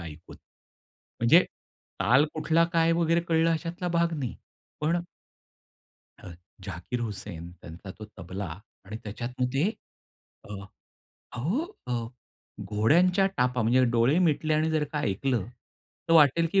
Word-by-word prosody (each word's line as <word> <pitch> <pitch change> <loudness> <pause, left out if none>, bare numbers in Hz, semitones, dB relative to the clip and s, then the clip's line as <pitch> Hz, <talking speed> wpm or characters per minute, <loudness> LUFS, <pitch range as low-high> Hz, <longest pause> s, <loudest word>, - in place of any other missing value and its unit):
ऐकून. 80 -2 -10 0.8
म्हणजे 140 +10 +6 0.6
ताल 130 +4 +5
कुठला 165 +1 +2
काय 165 -1 +3
वगैरे 165 0 +2
कळलं 165 -1 +2
अशातला 170 +2 -3
भाग 170 -1 +1
नाही. 130 -4 -3 0.5
पण 165 +3 +1 1.2
हं, 85 - -9 0.3
झाकीर 95 +6 -5
हुसेन 100 -6 -6
त्यांचा 90 +2 -11
तो 110 - -7
तबला 95 +4 -5 0.4
आणि 105 +3 -6
त्याच्यात 115 +3 -5
मग 125 - +2
ते 150 +10 +2 0.8
अ, - - -6 0.8
अहो 160 - -3 0.6
घोड्यांच्या 170 - +3
टापा 125 -1 +1
म्हणजे 125 +3 +4
डोळे 120 +7 +3
मिटले 155 -3 +2
आणि 155 +1 +1
जर 155 -1 +1
का 150 - -1
ऐकलं 115 -1 -1 0.6
तर - - +3
वाटेल 160 +1 +6
की 195 - +5
140 Hz, 125 wpm, -27 LUFS, 110-165 Hz, 1.2 s, म्हणजे